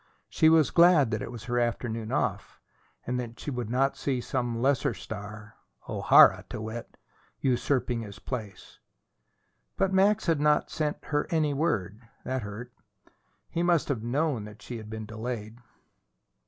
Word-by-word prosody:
She 160 - +4
was 160 -4 +4
glad 170 -8 +5
that - - -1
it 115 - -5
was 120 -3 -8
her 120 0 -1
afternoon 115 -2 -2
off, - - -2 0.5
and 125 +1 -1
that 120 -1 -6
she 145 - -4
would 125 -4 -4
not 135 +3 +1
see 135 -3 -1
some 120 -2 -2
lesser 135 +1 +1
star 105 0 -8 0.3
O'Hara, - - +6
to - - -5
wit 110 +2 -7 0.4
usurping 125 -2 0
his 105 -2 -9
place. 110 -3 -7 1.0
But 195 0 +1
Max 200 +3 +3
had 165 -4 +2
not 150 0 +2
sent 150 -1 -2
her 145 0 -1
any 155 -3 +1
word. 120 - -1 0.2
That 130 0 -2
hurt. 110 +4 -8 0.7
He 170 - -2
must 175 -3 +2
have 130 -6 -1
known 125 -1 -1
that 105 0 -12
she 120 - -6
had 110 -1 -9
been 110 0 -6
delayed. 110 +1 -6
125 Hz, 155 wpm, -28 LUFS, 110-150 Hz, 1.0 s, O'Hara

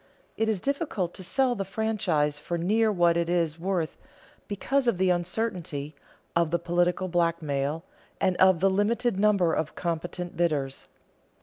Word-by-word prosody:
It 220 0 0
is 215 -4 0
difficult 275 - -2
to 185 - -9
sell 260 +6 +1
the 200 -4 -2
franchise 180 -8 0
for 170 +3 -3
near 215 +6 +2
what 175 -3 +3
it 170 0 0
is 165 -2 0
worth, 175 -3 -2 0.5
because 260 +6 0
of 235 - +2
the 185 0 +3
uncertainty, 175 -5 -2 0.4
of 170 -1 +3
the 170 - +1
political 175 +2 0
blackmail, 165 -3 0 0.4
and 185 -1 +2
of 185 -3 +5
the 195 - +5
limited 205 +2 +1
number 200 -5 +3
of 155 -1 -2
competent 175 +1 -4
bidders. 145 -6 -1
175 Hz, 150 wpm, -27 LUFS, 165-205 Hz, 0.5 s, of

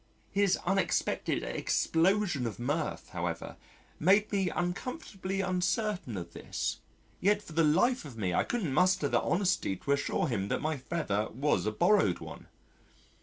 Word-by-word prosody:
His 200 -1 +3
unexpected 190 -1 0
explosion 170 - +1
of 110 - -5
mirth, 145 +6 -2
however, - - -4 0.4
made 200 +6 +4
me 195 -3 +1
uncomfortably 195 - -3
uncertain 185 - -1
of 85 -1 -7
this, - - -3 0.4
yet 205 +2 +2
for 165 - -11
the 165 +1 +3
life 185 +12 +3
of 135 -7 -10
me 95 -5 -1
I - - +3
couldn't 195 - -2
muster 185 +4 +3
the - - +2
honesty 180 - +1
to 140 - -4
assure 140 0 +1
him 100 -6 -1
that - - -1
my 155 +1 -1
feather 125 -7 -2
was 135 -2 0
a - - +1
borrowed 110 - +3
one. - - -10
175 Hz, 150 wpm, -30 LUFS, 130-195 Hz, 0.4 s, made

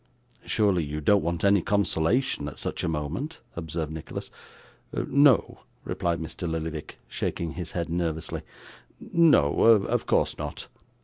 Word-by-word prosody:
'Surely 100 -6 +2
you 75 +1 -4
don't 100 +6 +4
want 85 0 -2
any 100 -1 +5
consolation 100 - +1
at 75 - -7
such - - -4
a - - 0
moment?' 85 - -3 0.2
observed 80 -1 -4
Nicholas. 80 -1 -7 0.6
'No,' 140 -4 +3 0.2
replied 85 -1 -1
Mr. 80 +1 -5
Lillyvick, 80 -1 -4
shaking 85 -2 -3
his 85 -1 -6
head 85 -1 -2
nervously: 85 -2 -2 0.6
'no 155 - +4
of 110 -3 +4
course - - +1
not. - - -5
85 Hz, 130 wpm, -26 LUFS, 80-100 Hz, 0.6 s, any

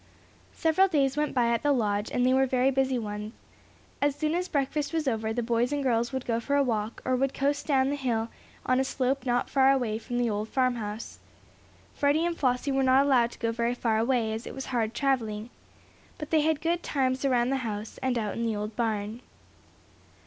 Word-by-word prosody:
Several 330 +4 +3
days 275 -6 +1
went 300 -1 -1
by 240 -2 +3
at 235 - +1
the 290 - +2
Lodge, 210 -5 0
and 245 - +1
they 255 - +4
were 265 0 +3
very 255 +1 +2
busy 265 -1 +1
ones. 210 -1 -5 0.7
As 285 -1 +2
soon 305 +1 -1
as 360 +1 -1
breakfast 290 0 -1
was 320 -3 -1
over 220 -3 0
the 240 +2 -1
boys 235 +2 +1
and 290 -1 -1
girls 235 -1 +1
would 260 -1 -4
go 230 -1 0
for 280 +5 -1
a 285 - +4
walk, 220 -3 -2
or 255 - +2
would 270 +1 0
coast 285 +1 -1
down 270 -2 +2
hill 240 -5 -1 0.4
on 255 0 +2
a - - +3
slope 265 0 -1
not 245 0 +1
far 270 -1 +4
away 240 -5 0
from 240 +2 -5
the 245 -1 +1
old 210 0 -2
farmhouse. 235 -4 -2 0.7
Freddie 290 +3 +2
and 345 -1 -1
Flossie 255 -1 0
were 270 0 +1
not 265 +1 +4
allowed 250 -4 +3
to - - -13
go 230 -1 -1
very 235 +1 -1
far 225 -3 0
away, 230 -2 +1
as 220 +1 -5
it - - -7
was 270 - -5
hard 230 -2 0
traveling. 235 -5 -1 0.7
But 300 -3 -7
they 315 -1 +4
had 315 -1 +1
good 340 +1 0
times 260 -4 -1
around 250 -2 +2
the 270 - +1
house, 220 -4 -5
and 260 -2 0
out 215 -3 -2
in 230 - -3
the 220 - -1
old 210 +1 -4
barn. 220 0 -2
255 Hz, 215 wpm, -27 LUFS, 230-275 Hz, 0.7 s, they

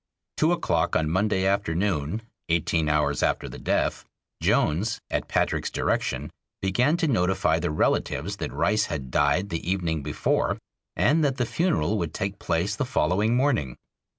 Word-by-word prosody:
Two 155 +2 +3
o'clock 175 - +1
on 80 0 +1
Monday 95 +1 +1
afternoon, 95 -1 0 0.3
eighteen 80 -1 +1
hours 75 0 +1
after - - 0
the - - -9
death, - - 0 0.4
Jones, 95 +9 +1
at - - -1
Patrick's - - 0
direction, - - -1 0.3
began 125 - +2
to 165 - +1
notify 95 -8 +2
the - - -1
relatives 80 +4 0
that - - -4
Rice 105 +2 +1
had 65 -6 -5
died 75 +9 +2
the 80 - -3
evening 85 -5 0
before, 75 +1 0 0.4
and 155 +2 +3
that 140 -2 +1
the 120 - +1
funeral 110 - 0
would 85 -3 -3
take 100 +1 -3
place 85 +4 0
the 145 - -1
following 110 -3 +1
morning. 125 - +1
95 Hz, 150 wpm, -25 LUFS, 80-115 Hz, 0.4 s, Two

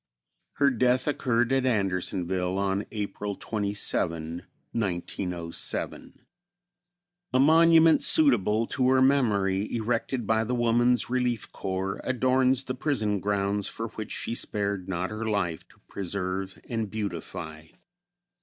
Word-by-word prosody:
Her 140 -1 +3
death 125 +1 +2
occurred 120 -4 +1
at 135 -1 +2
Andersonville 95 -4 0
on 100 +1 -1
April 105 -1 -4
27, 90 -6 -2 0.3
1907. 90 -4 -3 1.1
A 130 - +3
monument 165 +2 +6
suitable 115 -7 +3
to 130 +1 0
her 130 0 +4
memory, 105 -8 +2
erected 115 +1 -1
by 110 +1 +2
the 125 +3 -2
Woman's 120 +1 +2
Relief 125 -3 -1
Corps, 95 0 -3
adorns 130 0 +2
the 130 - -4
prison 115 -7 -1
grounds 100 +1 -1
for 115 0 -5
which 110 -1 -7
she - - -3
spared 100 -4 -2
not 90 +1 -2
her 110 +1 -3
life 90 -6 -2
to - - -24
preserve 95 0 -4
and 115 -3 -2
beautify. 85 -6 -6
105 Hz, 115 wpm, -27 LUFS, 95-125 Hz, 1.1 s, monument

